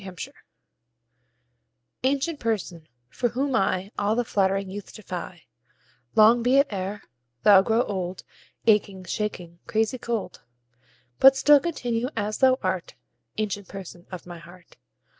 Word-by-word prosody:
7 190 -1 -9
Autoplay - - -7 1.7
Ancient 280 +4 0
Person, 190 -8 -3 0.2
for 240 - -1
whom 265 +3 -1
I 195 -2 0
All 205 +2 +1
the 245 0 0
flattering 195 -2 +1
youth 205 0 -8
defy, 180 -4 -7 0.7
Long 225 +2 +6
be 250 +3 +3
it 280 -5 +3
e'er 195 +2 -4 0.4
thou 200 -2 +8
grow 225 +4 +2
old, 185 -4 -4 0.4
Aching, 205 -4 +2
shaking, 175 -3 -4
crazy 225 +4 0
cold; 230 -4 -4 0.8
But 270 0 +8
still 290 +2 +6
continue 245 -7 -2
as 210 0 -2
thou 260 -1 +5
art, 185 -7 -2 0.4
Ancient 205 -2 -3
Person 185 -2 -10
of 180 -2 -8
my 175 -1 -9
heart. 175 +1 -16
210 Hz, 135 wpm, -25 LUFS, 185-240 Hz, 1.7 s, thou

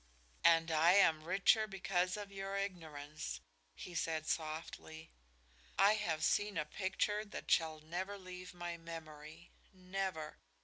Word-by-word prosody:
"And 165 0 +5
I 160 +3 +6
am 160 -6 +5
richer 195 +4 +4
because 185 -1 0
of 205 -1 -6
your 195 0 -3
ignorance," 155 - -4 0.4
he 180 - -8
said, 160 -2 -1
softly. 160 0 -4 0.7
"I 200 +3 +7
have 170 -7 -1
seen 205 -3 +2
a 150 - 0
picture 205 +4 -1
that 210 - -7
shall 160 -1 +3
never 185 +6 -4
leave 185 -1 -8
my 175 -1 -4
memory 160 0 -9 0.2
never! 185 -4 -4
175 Hz, 130 wpm, -37 LUFS, 160-195 Hz, 0.7 s, I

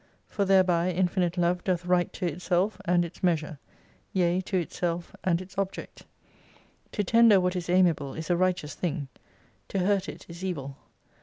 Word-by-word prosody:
For 200 - -1
thereby 185 -2 +3
infinite 180 0 0
Love 175 +1 +1
doth 180 -2 -1
right 180 -1 +2
to 185 - -4
itself 180 +5 0
and 175 -1 +3
its 170 - -11
measure: 160 -4 0 0.5
yea, 180 -1 +2
to 190 - -1
itself 175 0 -3
and 170 -2 +2
its 185 +1 -11
object. 195 -1 -5 0.9
To 210 - 0
tender 225 0 +6
what 180 0 0
is 175 -1 -4
ami 180 0 +5
able 140 -3 -7
is 160 +1 -4
a - - +4
righteous 180 -4 0
thing: 155 -5 -3 0.6
to - - -4
hurt 195 +1 +1
it - - -9
is 170 +2 -10
evil. 140 -8 -4
180 Hz, 170 wpm, -27 LUFS, 170-185 Hz, 0.9 s, tender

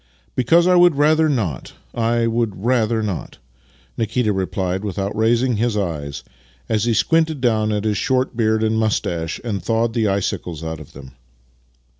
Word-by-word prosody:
" 70 - -38
Because 165 +8 +4
I 180 - +4
would 175 -3 +5
rather 155 +2 +3
not, 105 - -2 0.2
I 115 0 +1
would 115 -4 -1
rather 115 -3 +1
not," 100 -6 -5 0.6
Nikita 115 -1 0
replied 95 0 -2
without 100 0 -3
raising 115 +2 +2
liis 115 -1 0
eyes 70 -6 -4 0.4
as 110 0 0
he 120 - +2
squinted 160 0 +2
down 110 -4 +1
at 105 -1 -1
his 105 -2 0
short 130 +2 0
beard 110 -1 +1
and 110 0 +1
moustache 85 -7 -1
and 105 -6 -3
thawed 115 +4 0
the 115 -2 +1
icicles 90 -4 -2
out 80 -1 -5
of 75 - -13
them. 65 -1 -11
110 Hz, 165 wpm, -20 LUFS, 95-120 Hz, 0.6 s, would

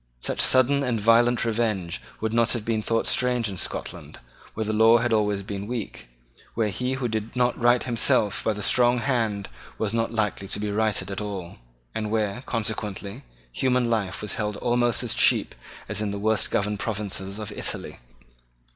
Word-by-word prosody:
Such - - -1
sudden 130 +2 +4
and 125 -4 0
violent 115 +3 +4
revenge 110 -7 -1 0.2
would 110 0 -1
not 115 0 +3
have 115 -4 -4
been 115 -1 0
thought 115 +1 0
strange 125 -2 +1
in 95 -3 -5
Scotland, - - -5 0.4
where 110 - -1
the 110 - -1
law 110 +2 +6
had 120 0 0
always 105 -2 +1
been 100 0 -5
weak, 115 - -5 0.5
where 110 -2 +1
he 125 +6 -2
who 130 -2 -1
did 110 +1 -4
not 125 0 +2
right 120 +1 +4
himself 115 -4 +2
by 110 - +1
the 105 0 -6
strong 120 +3 +4
hand 115 -6 -1 0.3
was 110 0 -2
not 115 0 0
likely 105 -3 -1
to 100 - -2
be 105 0 -2
righted 105 -1 0
at 95 - -4
all, 100 -4 -6 0.4
and 110 -1 -3
where, 110 +1 -1
consequently, 105 0 -3 0.3
human 125 - +1
life 100 -3 -1
was 105 - -3
held 105 -2 -2
almost 120 -1 +1
as - - -2
cheap - - +3 0.3
as 105 - -2
in 105 - -1
the 100 - -3
worst 110 0 +2
governed 105 0 -1
provinces 100 -2 -3
of 105 -2 -5
Italy. - - -4
110 Hz, 180 wpm, -25 LUFS, 105-120 Hz, 0.5 s, law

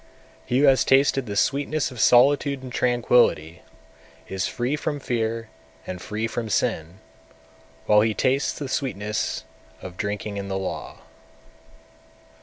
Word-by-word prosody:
205. - - -23
He 125 - +2
who - - +5
has 135 -2 +5
tasted 135 -1 +3
the 100 - -4
sweetness 140 +6 0
of 125 - -10
solitude 135 +3 +4
and 130 - -8
tranquillity, 120 -10 +2 0.7
is 95 -1 -2
free 125 +4 -2
from 150 0 -3
fear 115 -3 -2 0.4
and 90 -1 -6
free 105 +3 -3
from 115 0 -4
sin, 85 -2 -1 0.9
while 105 0 +5
he 110 0 +1
tastes 135 +2 0
the 145 - -5
sweetness 105 -6 -2 0.4
of 90 -1 -10
drinking 105 0 -4
in 100 0 -5
the 95 0 -2
law. 95 - -6
115 Hz, 140 wpm, -24 LUFS, 100-135 Hz, 0.9 s, who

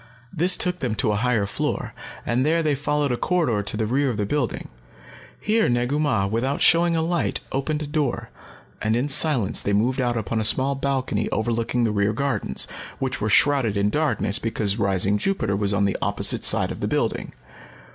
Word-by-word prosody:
This 180 +3 +4
took 180 0 +1
them 125 -7 -2
to 105 +1 0
a - - 0
higher 115 -1 +1
floor, - - -3 0.3
and 120 +2 +1
there 165 +3 +1
they 150 -2 +1
followed 145 0 -1
a 120 - -1
corridor 155 - 0
to 100 +1 -2
the 110 - 0
rear 135 +5 +1
of 115 - -3
the 105 - -1
building. 130 +2 -2 0.7
Here 220 +1 +1
Negu 120 +4 0
Mah, 130 -10 +1
without 115 +7 -1
showing 170 0 +4
a 160 - 0
light, 170 0 -1
opened 150 +3 -2
a - - -4
door, 145 -3 -2 0.5
and 110 +1 +1
in 125 +4 0
silence 140 -7 +2
they 100 - -1
moved 125 +6 +1
out 120 -1 0
upon 110 +1 -2
a - - -1
small 130 +5 +3
balcony 135 -1 -2
overlooking 115 +2 -1
the 115 - +1
rear 105 0 +1
gardens, 140 +4 -1 0.3
which 130 -3 -3
were 105 - 0
shrouded 130 -4 +3
in 100 +1 +1
darkness 150 -9 0
because 110 -2 -2
rising 100 +1 +2
Jupiter 115 - -1
was 100 0 0
on 100 0 +1
the 100 - -1
opposite - - +1
side - - +2
of - - -7
the - - -2
building. - - -2
125 Hz, 195 wpm, -23 LUFS, 105-145 Hz, 0.7 s, This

